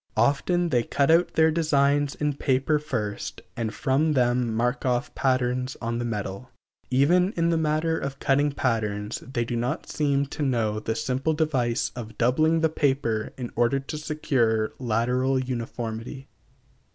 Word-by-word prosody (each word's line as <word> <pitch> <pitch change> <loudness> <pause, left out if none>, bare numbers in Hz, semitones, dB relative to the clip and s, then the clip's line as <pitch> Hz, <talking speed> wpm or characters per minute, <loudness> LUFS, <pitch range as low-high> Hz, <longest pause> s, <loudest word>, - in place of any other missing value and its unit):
Often 170 +9 +2
they 125 -5 +2
cut 140 +5 +1
out 170 +2 +3
their 160 0 +5
designs 145 -3 +2
in 150 -1 -1
paper 135 +2 +1
first 115 -9 -4
and 115 -2 -2
from 140 +7 +1
them 125 -2 +2
mark 120 +3 0
off 125 -1 0
patterns 130 0 0
on 115 0 -2
the 120 - -2
metal. 105 +1 -4 0.4
Even 175 - +3
in 170 0 +1
the - - +2
matter 160 +1 0
of 135 0 -4
cutting 145 +2 +2
patterns 105 -6 -1
they 125 -3 -3
do 120 - -3
not 120 +2 -2
seem 140 -2 +1
to 145 +2 -7
know 115 -6 0
the 110 +1 -3
simple 130 +6 -1
device 135 -7 0
of 115 -3 -8
doubling 155 +7 +3
the 160 - +3
paper 135 -7 0
in 125 -2 -5
order 120 +3 +2
to 135 +3 -6
secure 120 -8 0
lateral 125 +2 +1
uniformity. 120 0 -4
130 Hz, 155 wpm, -25 LUFS, 120-150 Hz, 0.4 s, their